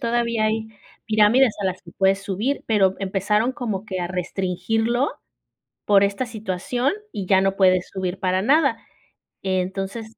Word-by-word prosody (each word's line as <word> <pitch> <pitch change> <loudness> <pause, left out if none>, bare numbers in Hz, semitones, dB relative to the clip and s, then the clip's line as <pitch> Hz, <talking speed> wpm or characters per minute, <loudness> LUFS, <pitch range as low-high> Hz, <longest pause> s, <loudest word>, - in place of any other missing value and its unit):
Todavía 235 -2 0
hay 220 0 -1 0.4
pirámides 220 +3 +4
a 195 - 0
las 185 0 -3
que 170 -2 -14
puedes 195 0 +2
subir, 205 +8 -2
pero 195 -4 +3
empezaron 205 +5 0
como 220 -7 -4
que 190 -4 -4
a 175 - -1
restringirlo 210 - -1 0.8
por 200 -1 +5
esta 200 +5 -1
situación 225 - -2 0.2
y 195 -2 -5
ya 190 0 +4
no 195 0 +1
puedes 185 -2 +3
subir 190 -1 -3
para 185 0 +1
nada, 295 +8 +3 0.7
entonces 195 +4 -3
200 Hz, 145 wpm, -22 LUFS, 190-225 Hz, 0.8 s, por